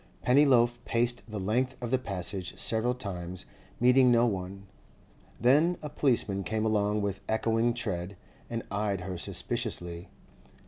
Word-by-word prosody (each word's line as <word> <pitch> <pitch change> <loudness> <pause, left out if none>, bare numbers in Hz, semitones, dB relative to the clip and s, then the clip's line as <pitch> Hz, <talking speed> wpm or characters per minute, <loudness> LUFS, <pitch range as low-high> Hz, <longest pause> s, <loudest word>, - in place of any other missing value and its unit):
Pennyloaf 125 -3 +4
paced 120 +1 0
the 105 -1 -4
length 125 +7 0
of 120 -1 -5
the 130 - +3
Passage 95 -4 -3
several 120 +2 +1
times, 90 -6 -6 0.3
meeting 125 +1 +5
no 120 0 +5
one. 95 -2 -3 0.8
Then 150 +9 +4
a 150 - -4
policeman 110 -9 +1
came 110 +2 -1
along 105 -1 +1
with 100 -1 -3
echoing 115 +1 +1
tread, 95 -5 -4 0.3
and 115 -1 -3
eyed 100 -2 -1
her 90 -1 -5
suspiciously. 85 +2 -3
110 Hz, 135 wpm, -29 LUFS, 95-120 Hz, 0.8 s, meeting